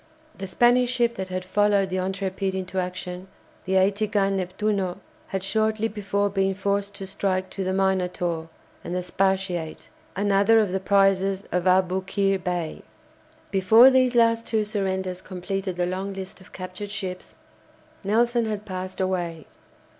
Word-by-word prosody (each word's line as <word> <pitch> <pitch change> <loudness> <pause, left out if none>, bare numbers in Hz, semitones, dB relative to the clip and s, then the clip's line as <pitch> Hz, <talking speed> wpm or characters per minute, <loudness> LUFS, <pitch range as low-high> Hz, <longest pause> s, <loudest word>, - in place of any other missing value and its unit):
The 195 - -6
Spanish 245 +5 +3
ship 240 -2 +2
that 190 -4 -5
had 185 0 -4
followed 200 0 +2
the 185 - -1
"Intrépide" 190 0 -2
into 190 0 -3
action, 180 0 -5 0.4
the 190 0 0
80 200 +3 +3
gun 195 -2 +1
"Neptuno," 190 0 -1 0.3
had 190 -1 -3
shortly 220 +2 +1
before 205 -1 -1
been 195 -1 0
forced 200 +1 -1
to 195 - -6
strike 185 -1 -2
to 195 - -3
the 185 - -1
"Minotaur" 180 -3 0 0.3
and 175 - -4
the 180 - -1
"Spartiate," 185 -3 -1 0.3
another 200 +2 +3
of 210 -4 +1
the 190 - 0
prizes 195 0 +2
of 180 0 0
Aboukir 190 +1 +1
Bay. 175 -3 -3 0.7
Before 220 +7 +7
these 255 -1 +3
last 230 -1 +3
two 220 -2 +1
surrenders 190 -3 -2
completed 185 +1 -4
the 175 0 0
long 190 +2 -3
list 190 0 -8
of 185 - -17
captured 185 +2 -7
ships, 185 -3 -6 0.7
Nelson 235 +3 +2
had 210 -1 -4
passed 185 -1 -6
away. 175 -4 -2
195 Hz, 150 wpm, -25 LUFS, 185-205 Hz, 0.7 s, Before